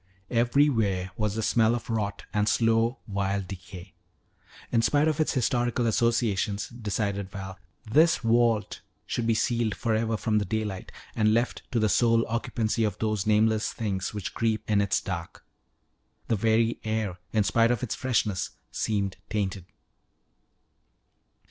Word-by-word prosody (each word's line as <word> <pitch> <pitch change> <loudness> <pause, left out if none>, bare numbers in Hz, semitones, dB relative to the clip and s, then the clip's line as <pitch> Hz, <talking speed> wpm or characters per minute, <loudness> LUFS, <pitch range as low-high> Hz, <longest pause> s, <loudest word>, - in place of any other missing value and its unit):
Everywhere 115 -6 +2
was 105 -2 -1
the 110 - -2
smell 115 +1 +3
of 120 - -6
rot 105 -3 -2
and 105 0 +2
slow, 115 +2 +2
vile 100 -1 -1
decay. 95 0 -10 0.8
In 115 - +3
spite 145 +6 +3
of 155 0 0
its 155 - +1
historical 120 -1 +1
associations, 110 -3 +1
decided 100 -4 -3
Val, 95 -2 -8 0.3
this 155 +9 +4
vault 115 -2 +1 0.2
should 120 -2 -2
be 115 - +3
sealed 115 -2 0
forever 115 0 0
from 105 0 +1
the 105 - -2
daylight 105 -2 -3 0.2
and 110 -1 +3
left 120 +2 0
to 125 - 0
the 110 - +3
sole 115 +1 +3
occupancy 115 0 -1
of 105 - -1
those 110 -2 -1
nameless 110 0 +3
things 95 -4 -3
which 105 -3 -5
creep 110 -2 -1
in 105 -1 +3
its 100 -1 +1
dark. 85 -4 -6 0.8
The 115 - +3
very 115 +2 +2
air, 110 -5 -2
in 110 -2 +2
spite 115 +3 +3
of 120 0 0
its 125 - -2
freshness, 110 -7 0 0.2
seemed 100 -3 -1
tainted. 100 -4 -2
110 Hz, 145 wpm, -27 LUFS, 100-115 Hz, 0.8 s, this